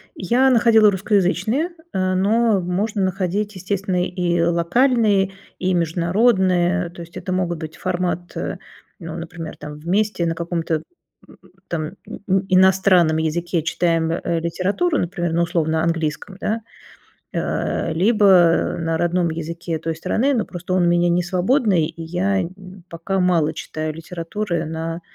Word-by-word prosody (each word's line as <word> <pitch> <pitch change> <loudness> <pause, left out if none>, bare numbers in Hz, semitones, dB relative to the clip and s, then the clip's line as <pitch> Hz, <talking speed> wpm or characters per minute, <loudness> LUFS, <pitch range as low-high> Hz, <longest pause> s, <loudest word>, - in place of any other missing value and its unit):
Я 245 +8 +2
находила 225 -3 +5
русскоязычные, 200 - +1 0.2
э, 185 0 0
но 215 +2 +3
можно 200 +4 -1
находить, 195 +2 -1
естественно, 185 -1 -1
и 175 -2 0
локальные, 195 +4 +2 0.3
и 185 0 0
международные. 180 +1 +2
То 175 - -11
есть 170 0 -10
это 185 - -5
могут 180 -2 -1
быть 160 -1 -7
формат, 175 -1 -2
э, - - -3 0.4
ну, 165 -2 -7
например, 165 -1 -7
там 150 0 -9
вместе 185 +3 0
на 165 0 -1
каком-то, 165 -2 -2 0.4
м, - - -17 0.3
там 155 -2 -3 0.2
и 190 -1 -1
иностранном 185 -3 +4
языке 170 +2 -1
читаем, 165 0 +1
э, 170 0 -1
литературу, 195 - 0
например, 175 -1 -2
на 170 - +2
условно 160 -2 0
английском, 165 +3 -2
да. 225 +2 -1 0.7
Э, 165 - -1
либо 190 -3 +4
на 165 -1 -1
родном 175 +1 +1
языке 165 +1 -4
той 165 +1 -3
страны, 250 - 0
но 225 -5 0
просто 180 0 -5
он 185 -1 +3
у - - +3
меня 175 0 +3
не 175 +1 +2
свободный, 185 - +2
и 165 - -8
я 190 +4 0
нь 185 +1 -9
пока 170 +3 -3
мало 175 -4 +2
читаю 155 0 -5
литературы 170 +1 -4
на, 165 +1 -4
180 Hz, 145 wpm, -21 LUFS, 165-195 Hz, 0.7 s, находила